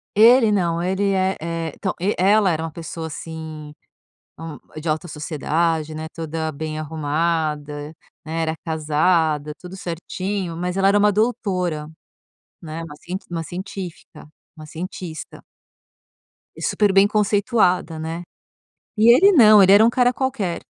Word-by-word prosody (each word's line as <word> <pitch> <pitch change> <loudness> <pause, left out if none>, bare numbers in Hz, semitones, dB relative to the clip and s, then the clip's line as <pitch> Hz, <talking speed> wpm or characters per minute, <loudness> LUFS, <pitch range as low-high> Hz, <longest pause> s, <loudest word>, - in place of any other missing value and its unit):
Ele, 225 +1 +6
não. 170 -4 +1
Ele 190 +3 0
é 190 0 +1
é 165 -1 -4
então, 190 - -3
e 195 +4 0
ela 200 +1 +4
era 160 -1 -2
uma 165 - -5
pessoa, 165 0 -6
assim, 155 -1 -8 0.7
hum, 160 -2 -7 0.2
de 160 - -5
alta 155 +3 -1
sociedade, 155 +1 -1
né, 155 +1 -5
toda 160 -1 -4
bem 155 +1 -5
arrumada, 155 -1 -2 0.3
né, 165 +1 -3
era 160 0 -1
casada, 155 -1 +1
tudo 180 +1 -10
certinho. 185 +1 -4
Mas 180 +2 -3
ela 195 0 +3
era 205 +1 +4
uma 205 0 +4
doutora, 185 -8 -1 0.7
né, 160 0 -6
uma 160 -3 -9
cient 180 +5 -6
uma 165 -1 -3
científica 180 -1 -8 0.3
uma 155 - -10
cientista. 165 0 -7 1.1
E - - -11
super 205 -2 +2
bem 195 +1 +6
conceituada, 205 -4 +1
né. 165 +2 -5 0.7
E 225 +2 +7
ele 390 +9 +6
não, 215 - +7
ele 190 - +6
era 205 +3 +7
um - - +5
cara 245 +1 +2
qualquer. 230 -10 -2
170 Hz, 145 wpm, -21 LUFS, 160-195 Hz, 1.1 s, E